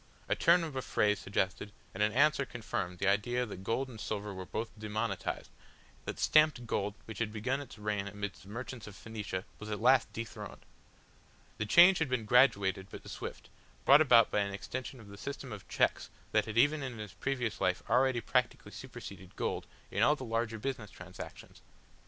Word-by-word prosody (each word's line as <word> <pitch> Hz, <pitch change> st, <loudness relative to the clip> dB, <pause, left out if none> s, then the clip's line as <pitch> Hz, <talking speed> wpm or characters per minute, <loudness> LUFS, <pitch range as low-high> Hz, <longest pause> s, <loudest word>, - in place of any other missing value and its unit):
A -, -, +2 dB
turn 170 Hz, +1 st, +5 dB
of 155 Hz, -4 st, -5 dB
a 130 Hz, -, -1 dB
phrase 105 Hz, -4 st, +1 dB
suggested, 95 Hz, +1 st, -1 dB, 0.2 s
and 95 Hz, -, -4 dB
an 105 Hz, 0 st, +4 dB
answer 145 Hz, +4 st, +4 dB
confirmed 100 Hz, -8 st, -4 dB
the 95 Hz, -, 0 dB
idea 120 Hz, +5 st, +2 dB
that 95 Hz, -4 st, -8 dB
gold 130 Hz, +6 st, 0 dB
and 115 Hz, -4 st, -9 dB
silver 105 Hz, -1 st, -3 dB
were 95 Hz, -1 st, -7 dB
both 115 Hz, +1 st, -3 dB
demonetised, 110 Hz, 0 st, -3 dB, 0.5 s
that -, -, -4 dB
stamped 155 Hz, -5 st, +4 dB
gold 105 Hz, -2 st, -1 dB
which 110 Hz, -2 st, -8 dB
had 115 Hz, -2 st, -1 dB
begun 125 Hz, +6 st, -1 dB
its 140 Hz, -, -10 dB
reign 105 Hz, -1 st, -2 dB
amidst 100 Hz, 0 st, -5 dB
the 95 Hz, -, -14 dB
merchants 120 Hz, +1 st, -6 dB
of 105 Hz, -, -10 dB
Phoenicia 105 Hz, -2 st, -5 dB
was 105 Hz, -, -7 dB
at 105 Hz, -, -2 dB
last 125 Hz, +2 st, +4 dB
dethroned. 115 Hz, 0 st, -7 dB, 0.9 s
The 105 Hz, -, -1 dB
change 175 Hz, -, +8 dB
had 160 Hz, -4 st, 0 dB
been 125 Hz, -4 st, 0 dB
graduated 100 Hz, -6 st, +4 dB
but -, -, -10 dB
swift, -, -, -7 dB, 0.3 s
brought 140 Hz, +3 st, +8 dB
about 120 Hz, -6 st, +6 dB
by -, -, +2 dB
an 100 Hz, -1 st, -1 dB
extension 130 Hz, +5 st, -6 dB
of 110 Hz, -, -13 dB
the 100 Hz, 0 st, -11 dB
system 140 Hz, -2 st, -6 dB
of 100 Hz, -4 st, -9 dB
cheques -, -, +1 dB, 0.2 s
that -, -, +3 dB
had 110 Hz, 0 st, -5 dB
even 145 Hz, +5 st, +4 dB
in 130 Hz, -4 st, -5 dB
his 105 Hz, -3 st, -7 dB
previous 125 Hz, -5 st, -2 dB
life 90 Hz, -1 st, +1 dB
already 125 Hz, +1 st, +3 dB
practically -, -, 0 dB
superseded 95 Hz, -2 st, -9 dB
gold -, -, -2 dB, 0.2 s
in -, -, 0 dB
all 150 Hz, -, +5 dB
the 130 Hz, -, -7 dB
larger 115 Hz, 0 st, -1 dB
business 120 Hz, -2 st, -4 dB
transactions. 95 Hz, -2 st, -10 dB
110 Hz, 190 wpm, -32 LUFS, 100-130 Hz, 0.9 s, change